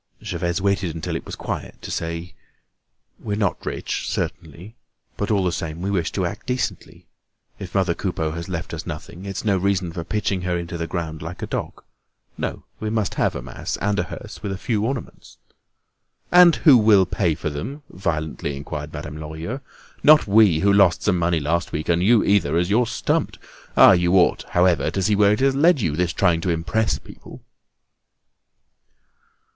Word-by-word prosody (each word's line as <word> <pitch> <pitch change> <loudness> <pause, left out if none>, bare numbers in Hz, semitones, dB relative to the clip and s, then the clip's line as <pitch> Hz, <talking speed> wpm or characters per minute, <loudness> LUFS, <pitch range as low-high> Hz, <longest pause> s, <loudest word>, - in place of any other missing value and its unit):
Gervaise 85 0 -2
waited 95 -4 0
until 80 - -4
it - - -5
was - - -6
quiet - - -6
to - - -6
say: 85 +1 -4 0.9
"We're 105 -1 -3
not 100 -4 -1
rich - - -3
certainly; 85 +8 -5 0.4
but 100 - -3
all 100 -3 +2
the 90 - +1
same 85 -1 -4
we 100 - -1
wish 90 -5 0
to 95 - 0
act 85 - -6
decently. 125 0 -3 0.5
If 95 -1 -8
mother 95 -3 +2
Coupeau 85 -4 -2
has 85 +3 -6
left 85 -3 -4
us - - -6
nothing, 90 +3 -7
it's 95 +2 -5
no 100 -3 +2
reason 95 -2 0
for 85 - -4
pitching 100 -1 -1
her 90 -1 -1
into 85 0 -5
the 85 -1 -3
ground 80 -3 -4
like 85 +3 -7
a - - 0
dog. - - -5 0.5
No; - - -4 0.2
we 110 - -3
must 110 -2 -1
have - - 0
a - - -5
mass, - - -5
and 105 0 0
a - - +2
hearse - - -9
with 100 -2 -3
a 95 - -3
few 105 0 -1
ornaments." 135 -2 -6 0.9
"And 175 -2 +8
who 140 -7 +6
will 105 -3 +5
pay 85 -4 0
for 75 -1 -4
them?" 135 - -6
violently 80 -5 -3
inquired 75 +1 -6
Madame 75 -1 -7
Lorilleux. 80 - -5 0.4
"Not 155 +1 +7
we, 100 -6 +4
who 100 0 +4
lost 100 -3 +4
some 90 -4 +2
money 85 -1 +1
last 85 +4 -1
week; 75 +2 -4
and 85 0 +3
you 110 +3 +4
either, 90 -6 +2
as 90 +2 0
you're 120 +3 +3
stumped. - - -1 0.4
Ah! - - +9
you 90 0 +3
ought, 90 - +4
however, 90 -1 +2
to 95 - -2
see 105 +3 +2
where 100 0 +4
it 105 - -2
has 135 0 +3
led 150 +3 +4
you, 80 -10 0
this 90 +1 0
trying 85 -3 +2
to 90 - -2
impress 85 +4 0
people!" - - -14
90 Hz, 190 wpm, -22 LUFS, 85-105 Hz, 0.9 s, Ah